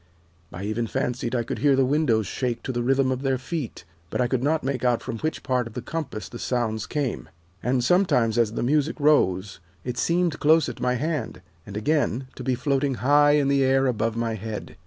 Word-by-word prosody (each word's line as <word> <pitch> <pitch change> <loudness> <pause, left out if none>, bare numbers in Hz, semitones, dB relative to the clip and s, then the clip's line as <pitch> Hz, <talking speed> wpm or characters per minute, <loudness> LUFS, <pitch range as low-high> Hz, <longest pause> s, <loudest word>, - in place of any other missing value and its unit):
I 90 - -7
even 110 +3 -2
fancied 125 0 -2
I 120 - +1
could - - -4
hear 145 -2 +4
the 135 0 +3
windows 130 -6 +2
shake 120 +4 -3
to - - -3
the 120 -1 -2
rhythm 135 +1 +2
of 130 0 -2
their 135 -1 +1
feet, 135 - -5 0.2
but - - -3
I 125 - +3
could 125 0 0
not 155 +4 +1
make 135 -2 -2
out 125 -2 +2
from 115 -3 -5
which 155 +1 -3
part 125 -3 0
of 115 - -11
the 125 - -4
compass 145 -10 -5
the 120 - -9
sounds 110 -4 -1
came. 145 -5 -3 0.3
And 125 0 +1
sometimes, 125 - +3
as 110 -2 +2
the - - -2
music 150 +5 +1
rose, 100 - +2 0.2
it 125 -1 -4
seemed 170 -2 +1
close 160 +2 +4
at 125 - -7
my 125 0 +1
hand, 145 - -3 0.2
and 100 0 -6
again, 130 0 0
to - - -8
be 130 -1 +1
floating 135 +1 0
high 145 +5 +4
in 145 -2 +3
the 140 -1 +3
air 135 0 +3
above 115 -3 0
my 115 -1 -1
head. 110 0 -6
130 Hz, 220 wpm, -25 LUFS, 115-145 Hz, 0.3 s, hear